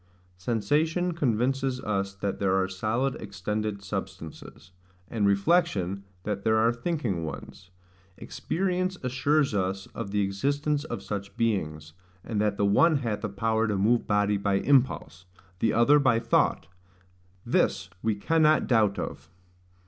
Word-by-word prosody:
Sensation 150 - 0
convinces 135 -2 0
us 100 -3 -2
that 100 0 -3
there 95 -1 +2
are 95 -1 +2
solid 110 +8 -1
extended 105 0 -4
substances; 95 -3 -7 0.4
and 105 -4 0
reflection, 100 - +1 0.2
that 100 -2 -3
there 110 -1 +3
are 115 +2 +3
thinking 120 - -2
ones: 90 +3 -8 0.5
experience 185 0 -2
assures 135 +2 +1
us 95 -1 -1
of - - -5
the 105 +1 0
existence 145 +9 0
of - - -5
such 100 -1 -6
beings, 80 -9 -1 0.3
and 105 -3 -2
that 105 -1 0
the 100 - +2
one 155 +12 +4
hath 115 -6 -3
a 105 - -1
power 110 +3 0
to 105 -2 0
move 115 +5 +2
body 105 0 +2
by 100 0 0
impulse, 120 -7 +1 0.3
the 110 - +2
other 140 +6 +5
by 130 -5 +3
thought; 115 -7 +1 0.8
this 95 -1 +1
we 110 -1 0
cannot 155 +7 +3
doubt 110 -5 +2
of. - - -6
105 Hz, 140 wpm, -27 LUFS, 100-130 Hz, 0.8 s, other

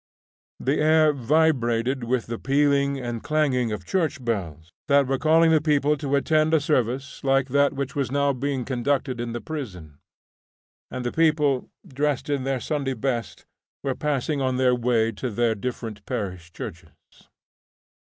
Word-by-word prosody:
The 135 +3 0
air 155 0 +4
vibrated 130 -3 +1
with 125 0 0
the 115 0 -5
pealing 140 0 +2
and 120 -2 -4
clanging 135 -6 +1
of 105 - -5
church 160 -9 -1
bells, 85 -8 -3 0.2
that 140 -1 +4
were 135 0 -1
calling 160 +1 +4
the 155 -2 +4
people 150 -1 +2
to 140 -1 -1
attend 155 +2 +2
to - - +6
a - - +1
service 135 -2 -1
like 135 0 +2
that 140 +2 +3
which 140 -1 -4
was 140 -4 -1
now 140 0 +2
being 135 -1 -2
conducted 130 -1 -1
in 120 -1 -4
the 120 - -4
prison. 90 - -7 0.9
And 125 -1 -5
the 120 - -1
people, 150 -5 +2 0.2
dressed 145 +1 -1
in 140 -2 -1
their 135 -1 0
Sunday 135 +1 -2
best, 120 -7 -3 0.4
were 135 -2 0
passing 145 0 -1
on 130 -1 0
their 130 -1 +3
way 120 -2 +1
to 120 +4 -4
their 115 +1 +1
different 110 -2 -5
parish 90 -8 -4
churches. - - -8
135 Hz, 160 wpm, -24 LUFS, 120-145 Hz, 0.9 s, to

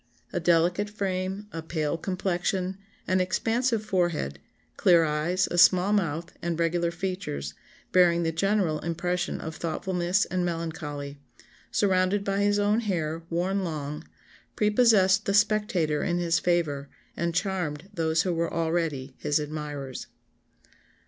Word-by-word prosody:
A - - 0
delicate 175 +4 +2
frame, 195 -1 -3
a 165 - -5
pale 160 -1 -2
complexion, 185 +1 -2 0.3
an 185 0 +2
expansive 225 +4 0
forehead, 170 - 0 0.4
clear 170 -2 +5
eyes, 160 +4 +1
a 175 - +1
small 185 +3 +6
mouth, 170 -4 -1
and 170 -1 -2
regular 170 +1 +1
features, 170 - -4 0.4
bearing 170 -2 +4
the 165 - 0
general 180 -2 +1
impression 175 +2 -2
of 160 0 -6
thoughtfulness 180 +4 0
and 185 0 -1
melancholy, 155 -4 -4 0.5
surrounded 190 0 +2
by 195 0 -1
his 205 0 +3
own 205 +2 +2
hair, 165 -7 -2
worn 185 +4 0
long, 150 -2 -4 0.5
prepossessed 210 -3 +4
the 200 - +2
spectator 205 -8 +2
in 175 -2 0
his 170 -1 +1
favour, 150 -6 0 0.3
and 170 -1 -2
charmed 180 -4 -2
those 160 -3 +1
who 180 - 0
were 170 0 -1
already 160 -5 -1
his 145 -1 +1
admirers." 150 -3 -5
175 Hz, 130 wpm, -27 LUFS, 160-190 Hz, 0.5 s, small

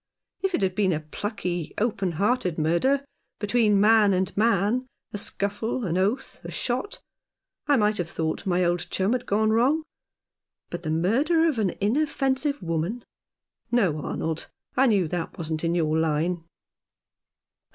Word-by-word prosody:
If 385 -2 +1
it - - -1
had 185 -1 +1
been 190 -2 +2
a 155 - -2
plucky, 175 0 -4
open 200 -5 0
hearted 195 -1 0
murder, 170 - +2 0.3
between 210 -1 +2
man 210 -1 +5
and 185 0 -1
man 225 +3 +2
— - - -63
a 205 - -2
scuffle, 205 +5 -2
an 170 -2 -1
oath, 205 +8 -1
a - - -7
shot 255 +12 -3 0.3
— - - -61
I 290 - +5
might 210 -2 +2
have 175 -1 -2
thought 160 +3 -3
my 180 -1 +2
old 175 0 0
chum 190 +3 0
had 250 -1 -2
gone 215 +2 +2
wrong; 265 +8 +3 0.9
but 175 - -4
the 160 - -4
murder 265 - +2
of 290 -8 0
an 195 -5 0
inoffensive 270 +3 0
woman? 170 +8 -2 0.7
No, 185 -11 +2
Arnold, 160 0 -3 0.3
I 265 +2 +4
knew 200 -7 +3
that 170 +1 -4
wasn't 160 -1 -3
in 170 0 +1
your 155 -2 +1
line." 160 +2 0
200 Hz, 160 wpm, -25 LUFS, 170-240 Hz, 0.9 s, man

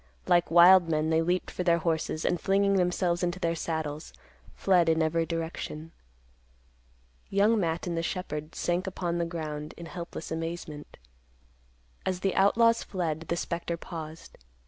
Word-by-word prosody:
Like 175 0 +3
wild 175 +1 +7
men 155 0 +1
they 160 0 +3
leaped 180 +2 -1
for - - -4
their 170 -1 +4
horses, 160 -1 -1
and, 175 - 0
flinging 200 0 +2
themselves 180 -1 +1
into 175 0 -1
their 170 -2 0
saddles, 155 - -4 0.4
fled 180 -4 +3
in 160 0 +3
every 165 +1 0
direction. 165 -1 -5 1.4
Young 210 +3 +3
Matt 165 -3 -1
and 175 -2 -2
the 165 - 0
shepherd 155 -3 -4
sank 175 +2 -1
upon 175 -2 -2
the 170 - +1
ground 155 -3 -5
in 170 - -8
helpless 170 -1 -7
amazement. 160 -2 -5 1.1
As 185 -1 -2
the 195 -1 +1
outlaws 230 +4 +4
fled, 165 -4 -3
the 170 - -1
spectre 170 0 -3
paused. 160 -1 -9
170 Hz, 150 wpm, -28 LUFS, 160-180 Hz, 1.4 s, wild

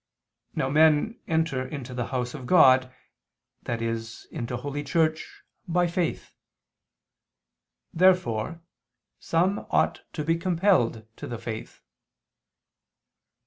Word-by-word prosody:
Now - - 0
men 155 - +3
enter 160 -5 0
into 130 -2 -7
the 125 -1 -3
house 125 -1 -3
of 130 -4 -8
God, 130 -6 +6 0.8
i.e. 115 -1 -2 0.3
into 120 0 -4
Holy 145 +3 -4
Church, 160 +1 -1 0.2
by 175 +1 +2
faith. 175 0 -2 1.6
Therefore 165 -5 +2 0.6
some 180 +5 0
ought - - +1
to 155 - -3
be 165 +1 +2
compelled 170 - +1
to - - -7
the 120 - -5
faith. 110 0 -7
145 Hz, 100 wpm, -26 LUFS, 125-170 Hz, 1.6 s, God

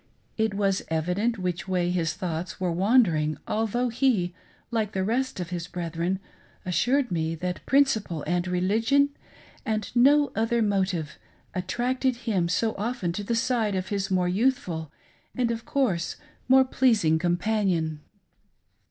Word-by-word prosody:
It 220 -2 0
was 195 -1 +1
evident 180 +9 0
which 180 -1 -3
way 180 -2 +1
his 165 -3 0
thoughts 175 -2 -4
were 180 -2 0
wandering, 170 -6 +3
al 225 +1 0
though 245 +3 0
he, 225 -8 +1 0.4
like 220 -3 -1
the 190 - 0
rest 245 +3 -1
of 175 -1 -5
his 175 -1 -4
brethren, 175 +1 -2 0.5
assured 245 - +1
me 165 -1 -1
that 180 +2 -4
prin 280 +1 +6
ciple 205 - -3
and 175 +2 0
religion 225 +10 +2 0.3
— - - -23
and 215 +1 -3
no 285 +4 +5
other 225 +1 +1
motive 185 -7 -1 0.2
— - - -34
attracted 245 +8 0
him 185 -7 +1
so 220 +5 +1
often 215 -5 -2
to 205 +4 -4
the 230 +3 -1
side 225 -3 +1
of 185 0 -3
his 200 -2 -1
more 185 -1 +2
youthful 180 - 0 0.5
and, 245 -2 +1
of 230 0 -4
course, 210 -12 0 0.3
more 265 +1 +6
pleasing 215 -12 +3
companion. 175 -3 0
195 Hz, 150 wpm, -26 LUFS, 175-235 Hz, 0.5 s, prin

